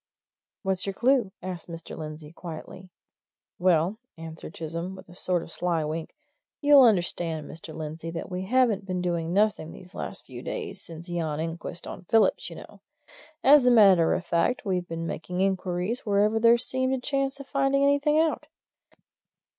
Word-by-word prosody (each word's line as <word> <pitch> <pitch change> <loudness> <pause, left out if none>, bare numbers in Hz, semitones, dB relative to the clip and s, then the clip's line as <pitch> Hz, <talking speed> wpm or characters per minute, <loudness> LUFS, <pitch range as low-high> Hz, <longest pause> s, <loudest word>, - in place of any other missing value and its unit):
"What's 190 -1 -1
your 195 - -1
clue?" 240 -2 +2
asked 185 -3 -6
Mr. 165 -1 -8
Lindsey 155 -1 -8
quietly. 175 +2 -9 0.7
"Well," 180 +3 +2 0.2
answered 160 0 -9
Chisholm, 170 +3 -5
with 185 - -13
a - - -12
sort 180 -1 -1
of - - -11
sly 170 -2 0
wink, 155 +1 -5 0.4
"you'll 290 -1 +7
understand, 175 - +2
Mr. 160 0 -9
Lindsey, 160 +1 -6
that 165 0 -5
we 185 0 -4
haven't 225 -3 +2
been 185 -1 -2
doing 170 -2 -1
nothing 200 -4 +1
these 180 +2 -13
last - - -6
few - - -9
days, 440 -5 -5
since 165 +1 -10
yon 165 -4 -2
inquest 165 +1 -5
on 185 - -8
Phillips, 225 +4 +2
you - - -9
know. - - -12 0.6
As 285 -4 +7
a - - +8
matter 195 -8 +6
of 180 - -4
fact, 170 +9 +1
we've 180 -3 -1
been 165 0 -4
making 180 +2 -4
inquiries 190 +3 0
wherever 210 +1 +2
there 230 +1 +6
seemed 260 +2 0
a - - -3
chance 275 +1 -1
of 275 - -8
finding 275 0 +1
anything 285 +2 +3
out. 315 -1 +1
185 Hz, 170 wpm, -27 LUFS, 165-235 Hz, 0.7 s, a